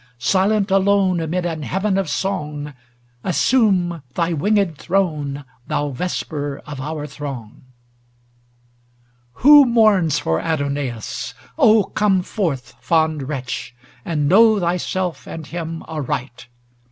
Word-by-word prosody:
Silent 195 - +1
alone 195 -2 +3
amid 170 +2 -2
an 165 -3 -3
Heaven 190 +5 -1
of 195 -4 0
song. 150 -4 -3 0.5
Assume 185 - +2
thy 170 0 0
winged 195 +1 +1
throne, 150 -7 -1 0.2
thou 145 0 -1
Vesper 145 -1 -3
of 145 -3 -7
our 150 +1 -4
throng! 135 -6 -7
' - - -22
XLVII 120 -1 -31 0.3
Who 290 0 +9
mourns 215 - +3
for 80 - 0
Adonais? 140 -4 -3 0.2
Oh, 225 -8 +5
come 195 -2 +1
forth. 145 - -3
Fond 160 -4 +1
wretch! 130 -3 -5 0.3
and 150 -2 -1
know 215 +5 +6
thyself 180 0 -2
and 160 -2 -7
him 165 0 -5
aright. 135 -6 -5
160 Hz, 115 wpm, -20 LUFS, 135-190 Hz, 0.5 s, Who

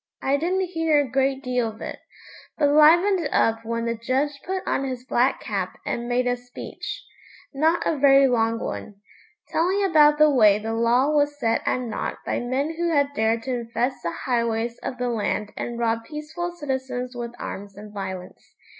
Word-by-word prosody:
I 275 +1 +2
didn't 360 +5 0
hear 325 -3 +2
a 285 - +1
great 270 0 +1
deal 250 -2 0
of 220 0 -12
it, - - -6 0.6
but 290 -2 +3
'livened 335 +3 +5
up 225 0 +2
when 230 +1 -2
the 230 - 0
judge 265 +5 -1
put 375 +1 -3
on - - 0
his 255 -2 -5
black 255 +1 +2
cap - - -3
and 240 0 -3
made 245 +1 +1
a 245 0 +1
speech, 245 - -8 0.5
not 320 +5 +2
a 305 - 0
very 275 0 +6
long 230 -2 +1
one, 210 - -5 0.5
telling 370 +5 +1
about 300 -5 +5
the 305 0 +6
way 215 -6 +5
the 220 +1 -4
law 240 +5 +3
was 290 -1 +1
set 230 -3 +1
at 255 - +1
naught 230 -3 -4
by - - -1
men 275 +6 -2
who 345 0 0
had 285 -3 +2
dared 225 -1 +1
to 260 - -2
infest 240 +2 -2
the 170 - -2 0.2
highways 235 -2 0
of 250 - -5
the 250 0 -1
land 210 -2 -2
and 240 -1 -4
rob 230 -1 0
peaceful 310 +6 -5
citizens 260 -5 -4
with 240 0 -6
arms 200 0 -7
and 210 0 -10
violence. 190 -2 -7
255 Hz, 185 wpm, -24 LUFS, 230-295 Hz, 0.6 s, very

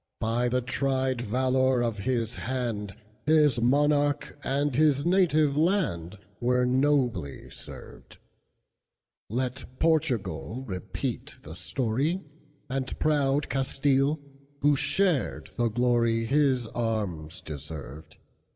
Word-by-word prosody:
By 120 +2 +1
the 125 +1 +1
tried 130 0 0
valor 130 +2 +2
of 115 -3 -2
his 115 0 -1
hand, 115 -6 -3 0.3
His 150 -6 +4
monarch 145 +3 +2
and 140 0 0
his 145 0 +3
native 165 -5 +3
landWere 125 - 0
nobly 130 - 0
served; - - -10 1.1
Let 130 +2 -4
Portugal 130 - 0
repeat 90 -3 -4
the 80 - -9
story, 130 - -1 0.4
And 130 0 -3
proud 145 -2 +2
Castile, 135 +2 +1 0.4
who 145 0 +4
shared 180 0 0
the 120 -1 +2
gloryHis 120 +3 +2
arms 100 -9 -2
deserved. 75 -1 -8
130 Hz, 95 wpm, -27 LUFS, 115-145 Hz, 1.1 s, His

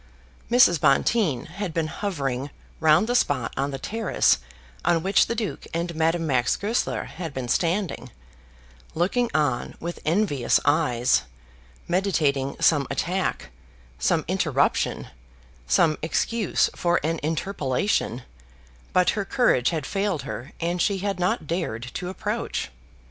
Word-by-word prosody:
Mrs. 230 - +5
Bonteen 145 - +2
had 180 0 -5
been 165 -1 +1
hovering 145 -8 -3 0.3
round 155 +5 +5
the 240 - -1
spot 135 - +1
on 135 +1 -1
the 135 - -4
terrace 195 - +1 0.4
on 165 -2 +2
which 195 +1 +3
the 230 - -2
Duke 215 -4 -4
and 170 +1 -2
Madame 165 +1 +1
Max 130 -5 +2
Goesler 220 +4 -1
had 165 -5 -7
been 130 -2 -3
standing, 170 - -1 0.9
looking 215 +9 +1
on 145 -6 0
with 170 +1 -5
envious 155 - +2
eyes, 140 -5 +3 0.7
meditating 155 -7 +1
some 145 -5 +3
attack, 185 - -2 0.5
some 160 - +1
interruption, 155 -7 0 0.6
some 160 - +3
excuse 210 +5 +1
for 175 0 +1
an 165 +1 -1
interpolation, 150 - -1 0.7
but 180 -1 +4
her 205 - -2
courage 195 - +2
had 160 -4 -3
failed 195 -6 -1
her 130 +6 -6
and 175 +1 -1
she 200 - +2
had 195 -1 -2
not 180 -3 0
dared 155 -9 -3
to 180 - -4
approach. 185 - -3
165 Hz, 130 wpm, -25 LUFS, 140-190 Hz, 0.9 s, Mrs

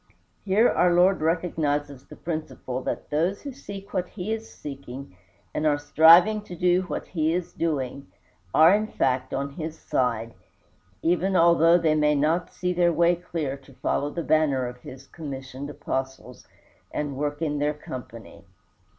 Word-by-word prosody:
Here 205 +4 +4
our 180 - +3
Lord 180 0 +4
recognizes 150 -4 -1
the - - -11
principle 155 -6 -5
that - - -5
those 170 +7 0
who 285 - -5
seek 200 -6 -10
what 180 -1 -1
he 210 +2 -4
is 225 0 -6
seeking, 135 -5 -9 0.4
and 155 - 0
are 145 -1 +3
striving 170 +8 +6
to 180 - -8
do 180 +1 +3
what 185 - -5
he 160 -1 0
is 180 -1 -4
doing, 140 -4 -2 0.4
are 160 - +7
in 215 +1 +1
fact 130 -7 0
on 140 0 -2
his 160 +2 -6
side, 115 -5 -1 0.7
even 180 +3 +1
although 170 0 +6
they 165 -3 +2
may 150 -1 +3
not 155 +5 +1
see 180 0 -2
their 175 -1 +3
way 170 +2 +3
clear 165 -5 -4
to 135 -1 -19
follow 145 +3 -1
the 170 +3 -4
banner 150 -5 +2
of 125 0 -6
his 135 +1 -11
commissioned 135 -3 -7
Apostles 130 -3 -5 0.4
and 145 -2 -3
work 145 +1 -2
in 150 -3 -1
their 150 +1 0
company. 115 -7 -10
155 Hz, 160 wpm, -25 LUFS, 140-175 Hz, 0.7 s, are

